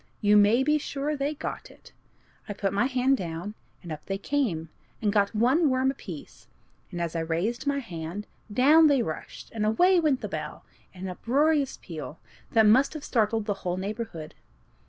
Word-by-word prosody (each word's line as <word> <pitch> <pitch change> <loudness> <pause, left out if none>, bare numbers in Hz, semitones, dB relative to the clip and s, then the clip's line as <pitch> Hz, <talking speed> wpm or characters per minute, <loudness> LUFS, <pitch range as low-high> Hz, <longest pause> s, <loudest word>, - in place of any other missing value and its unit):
You 210 -1 +4
may 210 +5 +5
be 300 +2 +2
sure 285 +1 -3
they 285 +2 -2
got - - -6
it. - - -18 0.6
I - - -2
put 195 -1 -2
my 205 +6 +2
hand 260 +1 +2
down, 170 +2 -5 0.3
and 170 - -8
up 155 -1 -6
they 195 - -2
came, 195 - -1 0.3
and 205 -2 0
got 205 0 +2
one 265 +9 +3
worm 260 +1 +2
apiece; 180 - -10 0.4
and 175 - -6
as 170 -1 -3
I - - 0
raised 175 - -2
my 285 0 +1
hand, 180 -4 -6 0.3
down 300 +8 +6
they 275 -5 +3
rushed, 155 - -7
and 220 -2 -3
away 350 - +4
went 300 -6 +1
the - - -3
bell, - - -6 0.3
in 185 -1 -11
an 190 - -3
uproarious 280 - +1
peal, 160 -2 -7 0.4
that 220 -1 +5
must 260 +8 +4
have 305 - -6
startled 220 -2 +1
the 205 - 0
whole 180 0 -2
neighborhood. 195 -5 -5
220 Hz, 185 wpm, -27 LUFS, 185-275 Hz, 0.6 s, down